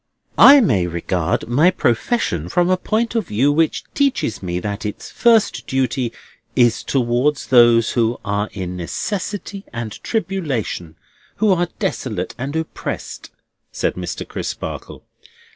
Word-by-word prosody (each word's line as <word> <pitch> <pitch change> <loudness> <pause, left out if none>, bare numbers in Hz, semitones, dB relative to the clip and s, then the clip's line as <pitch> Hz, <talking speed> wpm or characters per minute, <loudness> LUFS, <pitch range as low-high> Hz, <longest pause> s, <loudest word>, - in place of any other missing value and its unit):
"I 280 0 +10
may 100 - +2
regard 85 0 -1
my 145 +9 +4
profession 115 - 0
from 175 - +2
a - - +5
point 225 +5 -1
of 225 -7 -1
view 130 +8 +2
which 160 +2 +1
teaches 275 - 0
me 90 -2 -2
that 100 +2 -4
its 105 -1 -6
first 220 - +2
duty 130 -2 0 0.4
is 120 -2 +3
towards 130 +3 0
those 120 -3 +5
who 115 -1 0
are 100 +1 -1
in 90 -2 -5
necessity 200 - -4
and 115 -2 -5
tribulation, 150 - -2 0.4
who 215 -2 +2
are 175 -1 0
desolate 120 - -3
and 135 +4 -4
oppressed," 160 0 -5 0.4
said - - -1
Mr. - - -5
Crisparkle. - - -6
125 Hz, 130 wpm, -20 LUFS, -, 0.4 s, I